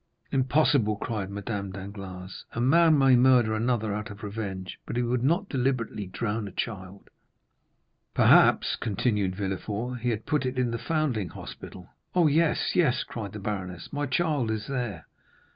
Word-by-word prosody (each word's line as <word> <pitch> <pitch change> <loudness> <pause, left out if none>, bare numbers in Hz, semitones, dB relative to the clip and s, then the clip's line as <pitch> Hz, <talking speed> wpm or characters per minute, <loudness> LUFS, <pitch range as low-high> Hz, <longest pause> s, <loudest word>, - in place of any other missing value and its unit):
"Impossible!" 130 -4 +3
cried 105 -2 -4
Madame 100 0 -4
Danglars: 95 -1 -8
"a - - -3
man 160 +5 +5
may 135 -2 +6
murder 125 -3 +5
another 110 -1 0
out 105 +2 -4
of 100 +2 -10
revenge, 100 -3 -5
but - - -4
he 120 - +2
would 120 0 0
not 170 +9 +2
deliberately 125 - -1
drown 105 +3 -3
a - - -8
child." 95 -1 -6 1.0
"Perhaps," - - +5
continued 105 -3 0
Villefort, 105 +5 -3
"he 120 +1 -1
had 110 -1 -2
put 150 -2 +1
it 130 0 -3
in 125 -2 +1
the 115 - -3
foundling 145 - -1
hospital." 90 -1 -10 0.3
"Oh, 175 -2 +5
yes, 155 +2 +2
yes," 150 -9 +3
cried 105 -5 -6
the 105 - -6
baroness; 95 - -5
"my 145 0 -1
child 145 -3 0
is 110 -1 -2
there!" 120 - -4
115 Hz, 160 wpm, -27 LUFS, 100-130 Hz, 1.0 s, may